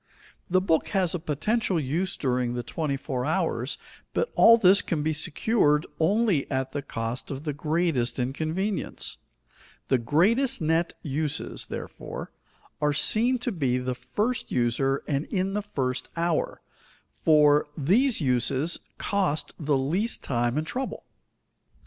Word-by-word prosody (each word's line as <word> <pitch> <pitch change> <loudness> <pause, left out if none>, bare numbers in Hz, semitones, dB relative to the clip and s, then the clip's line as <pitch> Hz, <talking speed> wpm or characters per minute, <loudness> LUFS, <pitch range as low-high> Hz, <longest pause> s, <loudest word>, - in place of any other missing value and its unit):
The 185 +1 +3
book 165 -4 +1
has 180 -3 +1
a 180 - -1
potential 185 - 0
use 165 +7 -2
during 125 -2 0
the 120 - -3
twenty 150 -1 -2
four 130 -2 -3
hours, 150 -5 0 0.4
but 480 - 0
all 230 0 +7
this 195 -2 +6
can 155 -4 -2
be 155 +1 +1
secured 150 0 +1
only 195 -2 +2
at 130 -1 -1
the 145 - -3
cost 115 -2 -5
of 135 0 -5
the 150 -2 -2
greatest 150 -4 0
inconvenience. 155 +10 -2 0.7
The 130 - +3
greatest 220 - +2
net 165 +2 +1
uses, 150 0 -3
therefore, - - -7 0.5
are 150 0 +2
seen 235 - +3
to 245 - 0
be 135 - 0
to 125 - -3
the 125 0 -1
first 225 - -2
user 130 +3 +1
and 140 0 0
in 195 -1 -1
the 210 - 0
first 130 -11 -3
hour, 165 -1 -1 0.5
for 150 -2 +4
these 215 - +3
uses 135 +3 +1 0.2
cost 190 -7 0
the 150 -3 +1
least 175 - -1
time 120 0 0
and 155 - 0
trouble. 260 +10 -4
155 Hz, 145 wpm, -26 LUFS, 135-190 Hz, 0.7 s, all